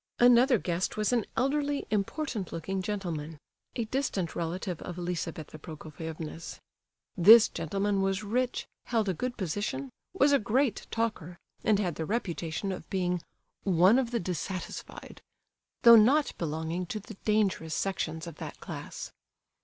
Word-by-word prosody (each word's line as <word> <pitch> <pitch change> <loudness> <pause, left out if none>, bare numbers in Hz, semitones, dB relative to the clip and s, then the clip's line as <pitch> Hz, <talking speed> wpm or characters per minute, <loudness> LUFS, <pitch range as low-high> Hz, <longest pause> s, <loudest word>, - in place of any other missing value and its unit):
Another 245 +1 +6
guest 180 0 -2
was 215 +3 +1
an 235 -4 +1
elderly, 285 +2 +1
important 215 - -2
looking 190 +4 -3
gentleman, 170 -6 -4 0.4
a 235 - -1
distant 215 -8 -2
relative 175 +1 -3
of 180 - -6
Lizabetha 165 -3 -4
Prokofievna's. 160 +1 -7 0.6
This 210 +5 +9
gentleman 200 0 -1
was 195 +1 0
rich, 245 +4 -1 0.2
held 225 -3 0
a - - +1
good 245 +9 -3
position, 160 - -3 0.2
was 290 -6 +3
a 280 - +5
great 235 +2 0
talker, 210 -7 -2 0.3
and 215 -2 +4
had 180 -6 -1
the 160 - -2
reputation 180 -3 -2
of 185 - -7
being 180 -2 0 0.4
"one 190 +5 +5
of 250 -3 -1
the 235 -1 -1
dissatisfied," 180 +1 -5 0.6
though 235 -1 +10
not 275 +8 +4
belonging 160 +2 -2
to 215 - -3
the 210 +2 -10
dangerous 195 -7 +1
sections 160 -4 -2
of 170 - -9
that - - -7
class. - - -7
195 Hz, 140 wpm, -29 LUFS, 170-230 Hz, 0.6 s, though